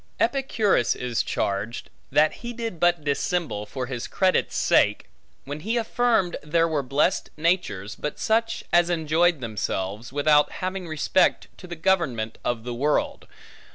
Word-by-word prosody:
Epicurus 225 - +1
is 120 -2 -1
charged, 100 +4 -3 0.2
that 150 +3 +3
he 240 0 -5
did 230 -7 -5
but 175 -2 +2
dissemble 145 - -1
for 130 +3 -4
his 125 -2 -5
credit's 185 -1 +1
sake, - - +3 0.4
when 145 +2 -5
he 220 +8 -1
affirmed 230 -5 +1
there 165 +2 +2
were 155 -3 0
blessed 140 +7 0
natures, 155 - 0
but 150 - -5
such 225 +1 0
as 175 0 +5
enjoyed 165 -1 +2
themselves, 105 -1 -3
without 150 +1 +3
having 185 -1 -4
respect 155 +3 +1
to 180 - -12
the 175 - -6
government 160 -11 0
of 120 -2 -2
the 120 0 -4
world. 145 +5 -1
155 Hz, 145 wpm, -25 LUFS, 125-185 Hz, 0.4 s, as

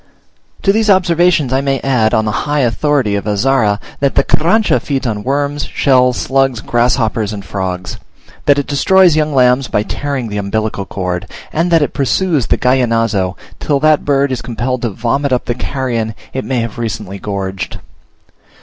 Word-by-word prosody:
To 195 - +4
these 220 0 +1
observations 175 -7 +3
I 135 - +2
may 135 -1 0
add, 125 -5 +2
on 110 - +1
the 105 +7 -2
high 145 0 +2
authority 130 -1 +1
of 100 0 -2
Azara, 105 0 +1 0.2
that 140 -1 0
the 140 - +4
Carrancha 185 +11 +2
feeds 140 -2 -2
on 105 -3 -2
worms, 145 +2 -1
shells, 125 -2 +2
slugs, 135 -3 +1
grasshoppers, 115 -2 0
and 100 -2 -7
frogs; 90 -2 -4 0.5
that 145 -1 +5
it 145 - 0
destroys 175 +4 +4
young 155 -1 +1
lambs 125 -1 +3
by 105 - 0
tearing 135 0 -3
the 105 - -4
umbilical 100 0 -2
cord; 90 -1 -4 0.3
and 165 +3 +1
that 165 -3 +4
it - - -3
pursues 145 - 0
the - - +1
Gallinazo, 115 -7 +1 0.2
till 145 -2 0
that 155 -1 +3
bird 140 -1 +1
is 130 - -2
compelled 125 +1 -3
to 120 - -1
vomit 120 +7 -1
up 125 - 0
the 120 - -1
carrion 120 -4 -3 0.2
it 130 - -3
may 130 -3 -1
have 115 0 -5
recently 105 -4 -4
gorged. 95 -2 -4
125 Hz, 175 wpm, -15 LUFS, 110-145 Hz, 0.5 s, that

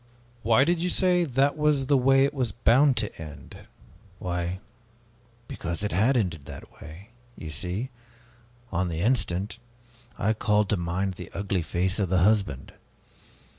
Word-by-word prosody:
'" 120 - -31
"Why 115 +4 +4
did 170 +3 +1
you 180 - 0
say, 180 -1 +2
'That 140 0 +1
was 150 -3 +2
the 140 +1 +3
way 135 +1 +4
it 140 - -2
was 125 -6 -1
bound 125 +5 +4
to - - -2
end'?" 75 -2 -11 0.5
"Why 90 -1 -3 0.9
because 85 +4 -4
it 105 - -1
had 115 +9 +3
ended 85 -10 -2
that 70 -1 -11
way! 85 +7 -11 0.3
You 80 - -7
see 90 - -3 0.8
on 90 0 0
the 85 -1 -3
instant, 105 -2 0 0.6
I 110 +2 +1
called 105 -1 +1
to - - +2
mind 90 +3 -2
the 90 -1 -9
ugly 100 -2 -1
face 90 +4 -1
of 95 -4 0
the 95 - +2
husband. 100 -10 +1
105 Hz, 160 wpm, -26 LUFS, 90-130 Hz, 0.9 s, Why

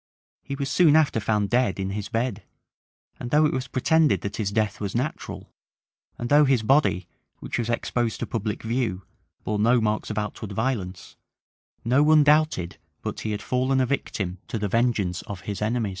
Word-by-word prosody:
He 140 - -5
was 140 0 -3
soon 150 +2 +4
after 155 -7 +3
found 105 -1 0
dead 120 -6 +2
in 95 0 -2
his 105 +1 -4
bed;[] 115 -2 -1 0.8
and 120 - -5
though 150 +4 +4
it 150 - +1
was 130 0 -2
pretended 155 +4 +2
that 100 0 -5
his 105 -3 -1
death 105 0 -1
was 100 0 -3
natural, 130 +5 -4 0.6
and 120 - -4
though 145 +3 +6
his 130 -5 +2
body, 110 - +2 0.3
which - - -4
was 120 -1 -2
exposed 120 0 -1
to - - 0
public 110 -2 -3
view, 110 -5 -1 0.4
bore 105 -1 -2
no 120 +4 +4
marks 105 -1 -1
of 105 - -4
outward 105 -1 -4
violence, 100 -6 -3 0.7
no 130 +4 +4
one 155 0 +6
doubted 150 - +2 0.2
but - - -4
he 110 - -4
had 105 -1 -3
fallen 130 +1 +1
a 130 - +3
victim 95 -9 -3
to - - -3
the 105 -1 -1
vengeance 110 -5 0
of 100 -3 -6
his 100 +4 -5
enemies. 110 0 0
115 Hz, 190 wpm, -25 LUFS, 105-130 Hz, 0.8 s, though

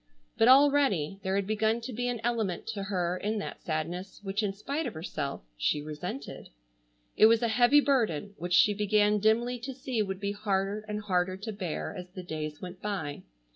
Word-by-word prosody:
But 225 - +4
already, 265 - +4
there 190 0 -1
had 200 -1 +1
begun 220 +2 +1
to 245 +2 -6
be 245 +2 -2
an 240 -2 -2
element 225 -7 -1
to 200 - -3
her 180 -3 -1
in 215 +3 -2
that 205 - -5
sadness 175 +4 -4
which 195 +2 -1
in 205 -2 0
spite 280 +11 -3
of - - -6
herself 155 -4 -4
she - - +1
resented. 150 -1 -6 0.7
It 215 - +7
was 230 +1 +4
a - - +3
heavy 245 +6 +5
burden 215 - +1
which 175 +1 -3
she 205 +3 +6
began 210 0 +3
dimly 235 +4 +2
to 260 +2 -6
see 255 -3 -2
would 190 -2 -3
be 200 0 -1
harder 205 0 -1
and 210 0 -3
harder 185 -2 0
to 215 +3 -5
bear 185 -4 -4
as 180 -1 -7
the 185 0 -8
days 155 -3 -5
went 180 0 -8
by. 185 -9 -3
205 Hz, 195 wpm, -29 LUFS, 180-225 Hz, 0.7 s, It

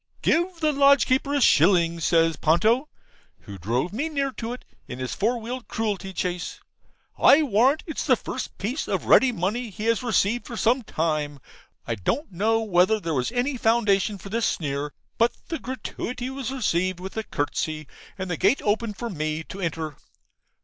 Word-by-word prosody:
'Give 345 +1 +1
the 310 -2 +2
lodge 280 -1 +5
keeper 265 +2 +1
a - - +3
shilling,' 170 - +4
says 165 0 +3
Ponto, 220 - +2 0.5
(who 100 -3 -10
drove 120 - -1
me 290 +9 -2
near 280 -3 -1
to 230 -2 -5
it 250 - -8 0.2
in 125 - -7
his 130 -1 -4
four 235 +4 0
wheeled 240 +2 -6
cruelty 205 -3 -2
chaise). 180 -2 -3 0.6
'I 310 +3 +7
warrant 260 +4 +3
it's 315 -2 -4
the 255 - +6
first 255 - -6
piece 240 +10 -3
of - - -2
ready 260 -1 +6
money 225 +4 -2
he 210 +2 -6
has 230 0 +2
received 235 -1 +1
for 235 - -6
some 240 +4 +2
time. 155 -7 -2 0.5
I 115 - -2
don't 220 - -2
know 220 +5 +1
whether 195 +1 +3
there 165 -4 -3
was 130 - -1
any 250 +2 -1
foundation 215 -3 +2
for 195 - -10
this 225 +2 0
sneer, 145 -1 -2 0.3
but 235 +1 +4 0.2
the 325 - -3
gratuity 250 0 -5
was 265 -2 -4
received 185 -8 0
with 190 +1 -7
a 220 - -1
curtsey, 155 -1 -3 0.3
and 190 -1 -4
the 175 -3 -2
gate 205 - +3
opened 210 0 0
for 235 -1 -4
me 155 -1 -3
to 195 +4 -9
enter. 160 -4 -3
215 Hz, 180 wpm, -25 LUFS, 170-250 Hz, 0.6 s, I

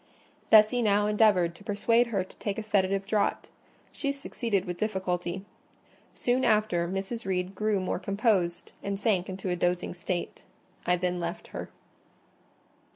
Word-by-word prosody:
Bessie 220 +3 +6
now 205 -2 +3
endeavoured 210 -5 +3
to 170 - -16
persuade 230 +3 +2
her 200 -5 0
to 185 - -17
take 205 -1 -3
a 220 - -3
sedative 195 -2 +1
draught: 205 +1 0 0.4
she 280 - -2
succeeded 235 -8 -2
with 175 -1 -5
difficulty. 190 -3 -2 0.7
Soon 250 +1 0
after, 210 -6 +2
Mrs. 195 +6 -4
Reed 185 0 -1
grew 210 0 0
more 185 -1 -2
composed, 200 -4 0
and 200 -1 -3
sank 195 -5 +1
into 190 0 -4
a - - +1
dozing 175 0 0
state. 175 0 -4 0.4
I 180 - +4
then 180 0 -1
left 170 0 -5
her. - - -6
195 Hz, 150 wpm, -28 LUFS, 180-215 Hz, 0.7 s, Bessie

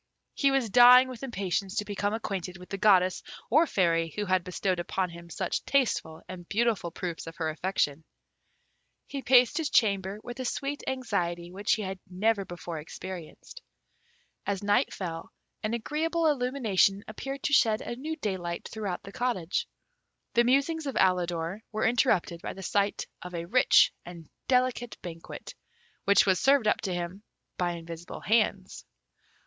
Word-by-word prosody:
He 280 - +3
was 270 -6 +1
dying 250 +2 +8
with 250 -3 -8
impatience 195 -5 -2
to 210 -2 -1
become 205 0 -2
acquainted 190 -5 -4
with 180 +1 -13
the 195 - -4
Goddess 185 -3 +4 0.3
or 310 +6 +5
Fairy 165 - +1
who 210 - -2
had 185 -2 +1
bestowed 185 0 -1
upon 180 +1 -2
him 170 0 -11
such 185 +2 -2
tasteful 240 - 0
and 175 -2 -9
beautiful 220 -4 +1
proofs 170 -1 -5
of 165 - -8
her 160 -2 -1
affection. 160 -3 -1 1.0
He 275 - -5
paced 250 +3 +5
his 310 -3 -1
chamber 200 -2 +2
with 240 +1 -8
a - - -2
sweet 280 +3 -3
anxiety 175 -9 -2
which 200 +3 0
he 215 - -1
had 190 0 -5
never 200 +3 +1
before 175 -2 -6
experienced. 180 - -9 0.8
As 200 -1 -2
night 205 0 +2
fell, 165 -4 -6 0.3
an 215 +2 -1
agreeable 320 +7 -1
illumination 245 -9 +2
appeared 270 +5 -6
to 295 - 0
shed 220 -5 +4
a 240 - -5
new 305 +6 -4
daylight 185 - -4
throughout 205 -5 -4
the 200 - -10
cottage. 200 -7 -1 0.7
The 235 - +5
musings 280 +5 +1
of 270 - -3
Alidor 180 0 +1
were 215 0 -1
interrupted 220 -8 +2
by - - -5
the 190 - -9
sight 200 +1 0 0.2
of 180 0 -7
a 170 0 -3
rich 250 +9 +5
and 170 -2 -11 0.2
delicate 250 -2 +1
banquet, 165 -2 -8 0.5
which 200 0 +5
was 190 -2 +3
served 270 -5 +4
up - - +2
to 195 - -3
him 175 +2 -4 0.3
by 175 -1 -1
invisible 170 0 -8
hands. 210 -4 0
200 Hz, 160 wpm, -28 LUFS, 175-245 Hz, 1.0 s, dying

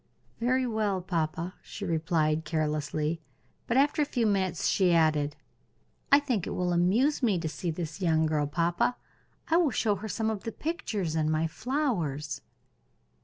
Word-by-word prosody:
"Very 255 +2 +2
well, 215 -5 0
papa," 170 0 -2
she 200 - -7
replied, 160 -2 +1
carelessly; 155 0 -1 0.5
but 235 - +1
after 290 +3 +3
a - - +5
few 245 -5 0
minutes 190 -5 +1
she 180 -3 +3
added: 155 -2 +2 0.8
"I 280 - +9
think 250 - -1
it - - -3
will 180 -1 0
amuse 215 - +2
me 215 -7 +3
to 165 -1 -2
see 170 +3 -4
this 160 +2 -5
young 160 -3 +3
girl, 150 -2 +1
papa. 170 - +1 0.5
I 325 - +4
will 345 -4 +4
show 220 -4 +1
her 215 +4 -6
some 220 +3 0
of 210 -3 -4
the 225 - -4
pictures 215 - -3
and 155 -1 +1
my 155 +1 +1
flowers." 160 - -2
180 Hz, 165 wpm, -29 LUFS, 155-225 Hz, 0.8 s, I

